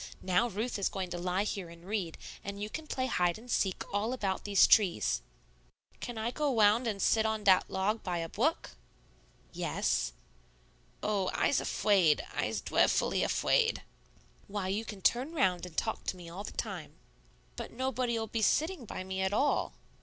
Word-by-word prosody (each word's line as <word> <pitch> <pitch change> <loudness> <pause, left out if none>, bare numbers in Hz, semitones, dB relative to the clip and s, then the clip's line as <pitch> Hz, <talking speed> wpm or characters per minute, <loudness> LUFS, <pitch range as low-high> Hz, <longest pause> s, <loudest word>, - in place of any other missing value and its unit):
Now 190 +6 +3
Ruth 215 +2 -3
is 195 - +1
going 185 -2 -4
to 175 - -3
lie 180 +2 0
here 195 -4 -4
and 170 +1 -14
read, 190 -5 -2 0.3
and 200 0 -5
you 210 +1 -4
can 315 -1 -6
play 255 -3 -1
hide 175 -8 +1
and 240 +2 -10
seek 190 -2 +1
all 215 +4 0
about 195 -7 -2
these 200 -1 +6
trees." 195 -6 +3 0.8
"Can 240 -2 -6
I 220 +2 -1
go 300 +2 0
wound 225 0 +4
and 210 -3 -2
sit 220 +3 +3
on 220 -1 -1
dat 190 -2 +5
log 210 +4 0
by 180 -2 -2
a 165 -1 -2
bwook?" 285 - 0 0.8
"Yes." - - 0 0.9
"Oh, 200 -3 +1
I's 285 - +2
afwaid. 185 -8 +3
I's - - -1
dweffully - - +2
afwaid." 465 -2 +2 0.6
"Why, 200 -2 -3
you 210 +4 -1
can 205 -4 -8
turn 260 +7 +2
round 185 - +1
and 160 - -14
talk 220 - -1
to 185 - -2
me 175 -1 -10
all 185 +4 -7
the - - -6
time." - - -5 0.6
"But - - -6
nobody'll 245 -2 -1
be 225 +1 -3
sitting 315 - +1
by 185 - -5
me 190 0 -3
at 190 +1 0
all." 280 +7 +1
205 Hz, 175 wpm, -31 LUFS, 190-235 Hz, 0.9 s, these